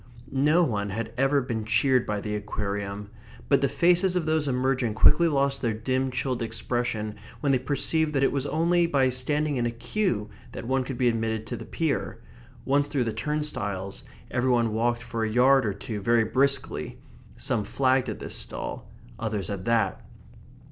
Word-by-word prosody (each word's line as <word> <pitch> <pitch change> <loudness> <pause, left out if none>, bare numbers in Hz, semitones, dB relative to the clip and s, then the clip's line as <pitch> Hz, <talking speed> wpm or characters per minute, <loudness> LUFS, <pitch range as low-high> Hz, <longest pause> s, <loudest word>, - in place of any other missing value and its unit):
No 150 +6 +3
one 105 -8 -1
had 110 +3 -4
ever 135 +2 +2
been 115 -4 -3
cheered 130 +3 +2
by 105 -1 -2
the 105 0 -3
Aquarium; 100 -1 -4 0.4
but 140 -1 +4
the 140 - +2
faces 175 +5 +3
of 175 -3 0
those 155 -2 +1
emerging 125 -3 0
quickly 160 +9 +5
lost 140 -2 +1
their 115 -3 0
dim, 130 +4 -1
chilled 125 -1 -2
expression 110 -1 -2 0.2
when 145 -2 +2
they 130 - +3
perceived 150 +4 0
that 135 -1 +2
it - - +3
was 140 0 -1
only 170 +3 +2
by 135 -5 +3
standing 145 +3 0
in 120 -1 +1
a - - 0
queue 115 - -1 0.3
that - - -6
one 130 +1 +1
could 130 -1 -5
be 125 - +2
admitted 110 -1 0
to - - -4
the - - -8
pier. 155 -7 -2 0.5
Once 140 +1 +2
through 140 -3 0
the 115 -2 -2
turnstiles, 105 -9 -3 0.3
every 125 +1 +1
one 120 -3 +2
walked 120 +1 0
for 115 -1 -3
a 110 - 0
yard 125 +2 +4
or 100 - 0
two 105 +1 -5
very 115 +3 +3
briskly; 135 +5 0 0.4
some 105 - 0
flagged 130 +2 +1
at - - -4
this - - -7
stall; - - -5 0.3
others 105 -5 -2
at 95 -2 -5
that. 115 -5 +1
125 Hz, 185 wpm, -26 LUFS, 110-140 Hz, 0.5 s, quickly